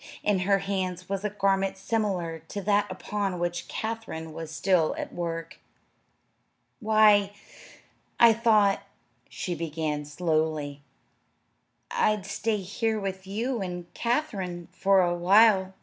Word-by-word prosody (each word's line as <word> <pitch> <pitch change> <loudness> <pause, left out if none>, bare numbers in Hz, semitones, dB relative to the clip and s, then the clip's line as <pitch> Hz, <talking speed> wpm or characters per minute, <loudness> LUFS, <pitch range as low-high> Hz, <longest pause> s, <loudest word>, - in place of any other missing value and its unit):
In 205 -2 +2
her 195 +2 +3
hands 185 -2 -3
was 195 0 -3
a 210 - 0
garment 195 -1 0
similar 190 -5 -2
to 205 - -5
that 205 0 +2
upon 195 0 -3
which 175 0 -3
Katherine 220 -8 -5
was 165 0 -6
still 165 0 +1
at - - -5
work. 165 -1 -5 1.2
"Why, 210 -3 +4 0.9
I 235 -1 +8
thought," 215 -3 +3 0.5
she 180 - -4
began 155 -2 -3
slowly, 155 -2 -1 1.1
"I'd 210 -2 +1
stay 210 +2 -1
here 215 +3 -2
with 190 -1 -5
you 230 +4 -2
and 180 -2 -6
Katherine 195 - -2
a 190 -3 +4
while." 190 +1 +4
195 Hz, 120 wpm, -27 LUFS, 175-210 Hz, 1.2 s, I